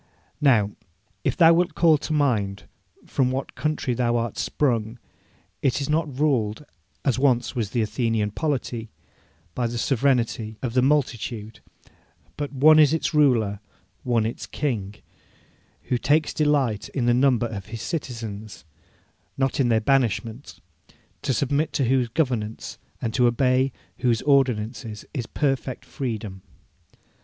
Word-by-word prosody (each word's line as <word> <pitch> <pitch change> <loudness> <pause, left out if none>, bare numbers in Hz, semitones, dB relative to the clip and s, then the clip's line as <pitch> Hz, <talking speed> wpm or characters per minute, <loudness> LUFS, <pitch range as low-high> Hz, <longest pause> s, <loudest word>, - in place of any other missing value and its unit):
Now, 110 -8 +4 0.5
if - - 0
thou 165 -1 +7
wilt 175 +1 +1
call 160 -3 +4
to 155 - -6
mind 110 -10 0 0.4
from 130 -3 +1
what 130 +1 -3
country 155 -4 -1
thou 120 -1 +1
art 115 -2 -2
sprung, 115 -5 -1 0.6
it 135 0 +1
is 140 - -3
not 150 -4 -1
ruled, 130 -4 +1 0.4
as 130 -3 +1
once 130 -2 +2
was 115 -5 -1
the 120 -1 0
Athenian 110 -1 -1
polity, 120 -4 -2 0.6
by 120 -2 -1
the 120 +1 -4
sovereignty 120 -4 0
of 120 -3 -2
the 125 - +3
multitude, 120 -5 -1 0.8
but 145 -1 -4
"one 155 +3 +6
is 150 0 +5
its 160 - -2
Ruler, 120 -9 +3 0.4
one 120 -3 +1
its 115 - -4
King," 105 -9 -3 0.9
who 125 - -1
takes 150 +4 +2
delight 140 -8 +1
in 130 -4 -2
the 120 - +4
number 125 -2 +3
of 105 -4 -6
His 115 +1 -7
citizens, 110 - -5 0.7
not 135 0 0
in 125 -3 +3
their 110 -1 +4
banishment; 120 -1 0 0.6
to - - -1
submit 140 +5 0
to 135 - +1
whose 130 0 +2
governance 115 -6 -2 0.2
and 115 - -1
to 125 0 +4
obey 130 +2 +2 0.3
whose 120 -3 +1
ordinances 120 -5 0
is 125 -6 -3
perfect 135 -3 -2
freedom. 110 -8 -5
125 Hz, 140 wpm, -24 LUFS, 115-140 Hz, 0.9 s, thou